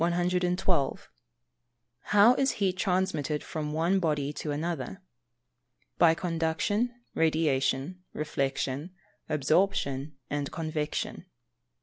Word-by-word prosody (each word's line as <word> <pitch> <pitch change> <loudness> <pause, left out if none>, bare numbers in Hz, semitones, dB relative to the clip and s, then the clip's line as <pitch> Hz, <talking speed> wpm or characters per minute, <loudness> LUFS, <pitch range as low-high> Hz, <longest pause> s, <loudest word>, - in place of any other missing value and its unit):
112. 180 -2 +1 0.9
How 210 +4 +6
is 270 +1 +1
heat 190 -3 0
transmitted 180 -6 0
from 150 -2 -4
one 170 +5 +2
body 150 -4 0
to 150 - -5
another? 155 +2 -3 1.0
By 165 -1 +6
Conduction, 170 +7 0 0.2
Radiation, 155 +1 +1
Reflection, 140 +2 -2 0.3
Absorption 150 -2 +1
and 145 -1 -2
Convection. 155 +2 -3
160 Hz, 85 wpm, -29 LUFS, 145-180 Hz, 1.0 s, How